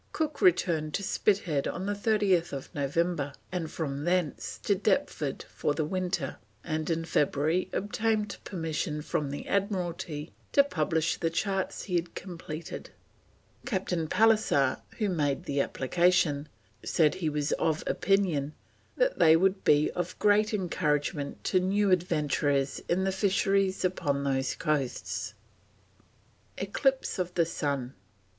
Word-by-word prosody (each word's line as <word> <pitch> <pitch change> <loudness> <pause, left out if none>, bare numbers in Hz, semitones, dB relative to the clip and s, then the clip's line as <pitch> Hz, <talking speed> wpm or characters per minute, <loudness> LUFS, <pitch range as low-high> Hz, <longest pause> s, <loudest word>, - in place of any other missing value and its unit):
Cook 310 -2 -2
returned 165 - +3
to 200 - -2
Spithead 185 -7 +1
on 185 - -3
30th 200 - +1
November, 145 +1 0 0.2
and 175 -4 -3
from 145 -3 -3
thence 175 -4 -1
to - - +3
Deptford - - 0
for 145 - -2
the 155 - 0
winter, 180 -4 -2 0.3
and 155 -1 -2
in 165 0 0
February 155 +2 +1
obtained 210 0 -1
permission 160 -3 -3
from 150 -2 -1
the 140 - -6
Admiralty 175 -6 -2 0.2
to 280 - +7
publish 160 - 0
the 165 - 0
charts 190 +3 -2
he 180 -3 0
had 170 0 -4
completed; 170 -3 -7 0.8
Captain 180 -7 -1
Pallisser, 215 -11 +3 0.2
who 215 - +1
made 145 -7 0
the 140 0 0
application, 155 0 +1 0.3
said 155 -3 +3
he 180 -4 -1
was 150 -1 -1
of 160 -1 0
opinion 170 -8 +1 0.4
that - - +1
they 160 0 +7
"would 190 +3 +2
be 150 0 +4
of 180 0 -4
great 210 +1 +3
encouragement 150 -7 -1
to 185 - +2
new 195 +2 +2
adventurers 150 -5 +1
on 180 +2 +2
the 190 - +1
fisheries 195 0 +1
upon 145 -6 0
those 135 -1 0
coasts." 140 -5 -2 1.2
ECLIPSE 265 +5 0
OF 180 -1 -2
THE 170 - +3
SUN. 140 -5 -2
170 Hz, 130 wpm, -29 LUFS, 150-195 Hz, 1.2 s, to